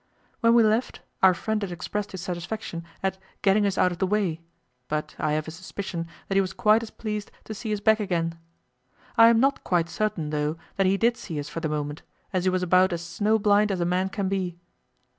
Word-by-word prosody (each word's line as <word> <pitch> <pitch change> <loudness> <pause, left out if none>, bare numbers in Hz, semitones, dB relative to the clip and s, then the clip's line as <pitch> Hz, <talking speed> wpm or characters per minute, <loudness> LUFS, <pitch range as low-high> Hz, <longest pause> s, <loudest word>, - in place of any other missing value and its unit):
When 230 0 +4
we 235 - +7
left, 220 +3 +1 0.2
our 190 -1 +6
friend 220 +3 -2
had 200 -3 -3
expressed 205 +4 -4
his 190 - -6
satisfaction 175 0 -5 0.2
at 190 0 -1 0.2
"getting 205 +1 +4
us 195 - -2
out 180 - +4
of 175 - -6
the 190 - +1
way"; 185 -5 0 0.5
but 150 0 -3
I 155 -1 +1
have 155 +1 -1
a - - -5
suspicion 175 0 -5 0.2
that - - -2
he 195 - +4
was 190 0 -3
quite 215 +1 +4
as 230 - -7
pleased 210 -2 -5
to 220 - -6
see 215 +1 -5
us 210 - 0
back 220 +1 +4
again. 170 -5 -1 0.8
I 230 - +8
am 230 -1 +5
not 275 +3 +2
quite 170 -2 +1
certain, 170 -7 -2
though, 150 +1 -1 0.2
that 195 -1 +3
he 195 +1 +3
did 235 +3 +2
see 160 -5 -5
us 145 - -5
for - - -4
the 160 -2 -2
moment, 150 0 -3 0.3
as 185 -1 0
he - - +4
was 185 0 0
about 185 +1 +4
as 170 0 -4
snow 210 +6 +1
blind 210 0 +3
as 190 - -1
a 170 - +1
man 180 +2 +1
can 195 0 -2
be. 185 -3 -2
190 Hz, 230 wpm, -26 LUFS, 170-210 Hz, 0.8 s, I